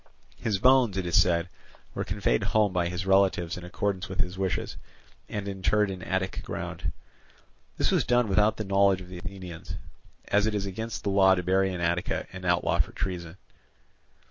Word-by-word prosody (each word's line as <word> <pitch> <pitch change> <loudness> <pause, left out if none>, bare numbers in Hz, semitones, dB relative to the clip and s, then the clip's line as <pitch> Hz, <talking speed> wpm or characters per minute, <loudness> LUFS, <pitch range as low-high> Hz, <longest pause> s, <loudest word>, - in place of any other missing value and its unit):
His 105 -3 -1
bones, 125 -2 +4
it 95 - -1
is 85 - +4
said, 85 -1 +2 0.5
were 100 - -2
conveyed 95 - 0
home 105 -3 +2
by 85 -1 +1
his 90 +1 -4
relatives 95 -3 +3
in 90 - -8
accordance 95 +1 -2
with 95 - -6
his 90 0 -1
wishes, 95 -1 -2 0.5
and 100 -1 -4
interred 100 +1 +1
in 95 -1 -7
Attic 95 0 -2
ground. - - -4 0.9
This - - +2
was - - +3
done 120 -1 +2
without 105 +2 +3
the 110 - -3
knowledge 100 -1 +3
of 90 - -11
the 90 -1 -7
Athenians; 95 -3 -7 0.5
as 105 +1 +3
it 110 - 0
is 100 -1 -1
against 110 +4 -5
the 100 - 0
law 95 -1 +5
to 90 - -2
bury 95 +2 +2
in 90 -1 -4
Attica 85 +1 0
an 90 0 -8
outlaw 90 0 +2
for - - +1
treason. 90 -2 -4
95 Hz, 185 wpm, -27 LUFS, 90-100 Hz, 0.9 s, law